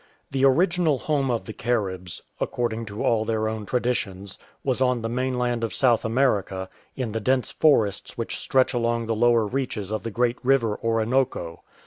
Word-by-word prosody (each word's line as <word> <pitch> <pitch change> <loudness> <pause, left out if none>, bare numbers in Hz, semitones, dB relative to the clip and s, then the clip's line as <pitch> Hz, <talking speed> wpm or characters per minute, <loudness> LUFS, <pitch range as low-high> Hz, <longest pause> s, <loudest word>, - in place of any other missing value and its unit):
The 135 0 0
original 170 +1 +3
home 140 -1 0
of 120 -2 -1
the 110 - -7
Caribs, 95 -8 -2 0.2
accord 120 -2 -1
ing 115 +1 -5
to 105 +1 -5
all 115 -2 +2
their 110 -1 -1
own 110 -2 -4
traditions, 100 -6 -2 0.2
was 130 -1 0
on 125 -3 +2
the 115 - -2
mainland 125 -1 -1
of 115 - -2
South 120 -4 +3
America, 105 -6 0 0.3
in 125 -4 -3
the 115 - -2
dense 130 +3 +1
forests 110 -10 +2
which - - -3
stretch 130 0 +2
along 115 -1 0
the 115 - -1
lower 120 0 +4
reaches 110 -4 -3
of 110 - -2
the 115 - -4
great 120 +2 0
river 125 -5 +2
Orinoco. 115 -6 0
115 Hz, 175 wpm, -24 LUFS, 110-130 Hz, 0.3 s, lower